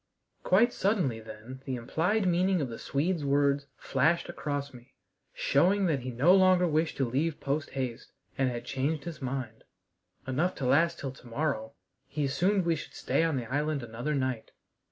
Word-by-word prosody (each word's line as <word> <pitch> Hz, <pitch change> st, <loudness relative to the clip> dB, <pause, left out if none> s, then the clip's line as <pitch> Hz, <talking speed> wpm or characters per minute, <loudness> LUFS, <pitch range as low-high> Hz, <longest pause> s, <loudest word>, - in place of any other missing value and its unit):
Quite 230 Hz, +6 st, +4 dB
suddenly 180 Hz, -, +1 dB
then 110 Hz, +4 st, -10 dB
the 130 Hz, -, -2 dB
implied 170 Hz, -, 0 dB
meaning 180 Hz, +1 st, +2 dB
of 140 Hz, -5 st, -2 dB
the 115 Hz, -, -7 dB
Swede's 160 Hz, +3 st, -1 dB
words 140 Hz, 0 st, +2 dB
flashed 160 Hz, +6 st, +1 dB
across 140 Hz, 0 st, -3 dB
me, 120 Hz, 0 st, -15 dB, 0.4 s
showing 190 Hz, +7 st, +2 dB
that 155 Hz, -6 st, +1 dB
he 130 Hz, +1 st, -5 dB
no 135 Hz, +9 st, +4 dB
longer 185 Hz, -2 st, +5 dB
wished 160 Hz, 0 st, 0 dB
to 135 Hz, -, +1 dB
leave 145 Hz, +6 st, -1 dB
posthaste, 135 Hz, -4 st, -3 dB, 0.2 s
and 135 Hz, -1 st, +1 dB
had 120 Hz, -1 st, -5 dB
changed 140 Hz, +3 st, -1 dB
his 170 Hz, -3 st, -7 dB
mind. 130 Hz, -4 st, -4 dB, 0.6 s
"Enough 155 Hz, +8 st, 0 dB
to 130 Hz, -, -4 dB
last 165 Hz, +6 st, +3 dB
till 135 Hz, -, -4 dB
to 130 Hz, -1 st, -15 dB
morrow" 115 Hz, -3 st, -2 dB, 0.3 s
he 145 Hz, 0 st, -2 dB
assumed 185 Hz, +7 st, +1 dB
we 170 Hz, -1 st, +2 dB
should 150 Hz, -, -9 dB
stay -, -, 0 dB
on 165 Hz, -4 st, +1 dB
the 120 Hz, -, -3 dB
island 145 Hz, +2 st, -1 dB
another 120 Hz, +6 st, -3 dB
night. 130 Hz, -4 st, -2 dB
140 Hz, 175 wpm, -29 LUFS, 130-170 Hz, 0.6 s, longer